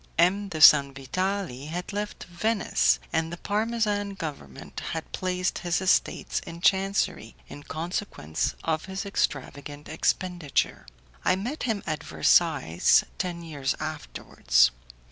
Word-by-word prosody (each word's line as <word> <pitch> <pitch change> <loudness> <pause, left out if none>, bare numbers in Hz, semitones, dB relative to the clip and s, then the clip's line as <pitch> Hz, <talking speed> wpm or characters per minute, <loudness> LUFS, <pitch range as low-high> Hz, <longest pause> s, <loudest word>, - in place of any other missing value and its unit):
M. 190 +5 +3
de 165 - -5
Sanvitali 145 +2 +4
had 175 +5 -5
left 205 +1 -4
Venice, 175 - +1 0.2
and 160 0 0
the 175 - -5
Parmesan 210 -1 -1
government 140 - -7
had 160 -1 -5
placed 185 0 -1
his 175 -1 0
estates 190 -1 +1
in 170 - -9
chancery 195 - +1
in 145 - -9
consequence 160 - -3
of 160 0 -1
his 190 +2 -5
extravagant 145 -5 -3
expenditure. 165 - -1 0.4
I - - +3
met 240 +11 -4
him 210 -3 -1
at 155 -2 -3
Versailles 80 +1 +3 0.2
ten 175 -2 -3
years 145 -4 -2
afterwards. 155 - +1
170 Hz, 120 wpm, -27 LUFS, 145-195 Hz, 0.4 s, Sanvitali